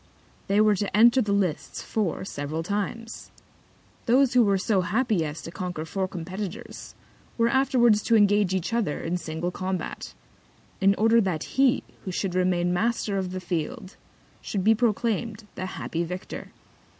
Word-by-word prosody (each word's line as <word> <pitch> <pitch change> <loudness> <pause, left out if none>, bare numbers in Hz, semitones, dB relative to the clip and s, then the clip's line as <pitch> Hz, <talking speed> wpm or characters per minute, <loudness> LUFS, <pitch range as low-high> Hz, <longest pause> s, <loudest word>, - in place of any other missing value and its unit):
They 200 +1 +2
were 215 0 +5
to 205 +1 -1
enter 235 +4 +6
the 210 -3 -1
Lists 190 -6 -1
four 195 -5 -2
several 155 -1 -4
Times. 210 +4 -4 0.8
Those 255 +2 +4
who 250 -1 +6
were 200 -2 +3
so 190 0 +1
happy 215 -1 +1
as 150 0 -5
to 165 - -7
conquer 175 -3 -4
four 190 +3 -2
Competitors, 185 +2 -7 0.4
were 230 0 +3
afterwards 240 -5 +3
to 230 - +3
engage 205 -3 +4
each 190 +5 -2
other 225 -11 0
in 170 +2 -1
single 170 +1 -4
Combat; 185 0 -4 0.6
in 195 0 +4
order 225 +2 +4
that 180 -6 -1
he 265 -2 +2 0.2
who 190 - -4
should 180 0 -2
remain 180 -1 +1
Master 210 0 0
of 185 -1 -3
the 185 +1 -4
Field 175 +1 -4 0.5
should 195 -3 -3
be 220 +3 +6
proclaim'd 225 -1 -1
the 185 - -4
happy 170 -2 -3
Victor. 180 +2 -7
195 Hz, 160 wpm, -26 LUFS, 180-225 Hz, 0.8 s, enter